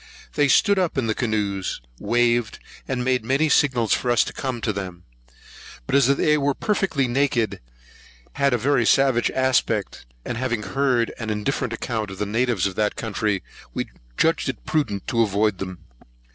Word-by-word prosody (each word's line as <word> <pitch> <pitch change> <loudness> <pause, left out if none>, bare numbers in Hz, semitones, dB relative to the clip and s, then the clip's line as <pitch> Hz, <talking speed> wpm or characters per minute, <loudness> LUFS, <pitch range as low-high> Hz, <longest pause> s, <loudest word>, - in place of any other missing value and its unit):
They 145 -1 +3
stood 200 +7 +4
up 180 -6 0
in 130 - +1
the 110 - +1
canoes, 105 -5 -2 0.2
waved, 120 -1 +1 0.3
and 125 -2 -2
made 130 -2 +1
many 135 +6 +1
signs 125 -7 +3
for 125 - 0
us 120 - +4
to - - -7
come 130 -3 -3
to 110 - -1
them. 90 -3 -6 0.8
But - - -5
as 140 -3 +5
they 150 +2 +3
were 140 -1 +1
perfectly 190 - 0
naked, 120 -6 0 0.7
had 140 -1 +2
a 120 - +2
very 125 +1 +2
savage 130 0 +3
aspect, 125 - 0 0.2
and 120 - -3
having 120 -4 -1
heard 120 +3 +1
an 110 -2 -4
indifferent 110 +3 -1
account 110 -2 -3
of 95 - -8
the 105 - -1
natives 115 -1 0
of 100 - -1
that 105 -1 +1
country, 105 -3 -2 0.3
we - - -3 0.3
judged - - +2
it - - -6
prudent 105 -11 -1
to 115 -2 +1
avoid 105 -2 +1
them. 95 -3 -7
120 Hz, 175 wpm, -23 LUFS, 105-135 Hz, 0.8 s, as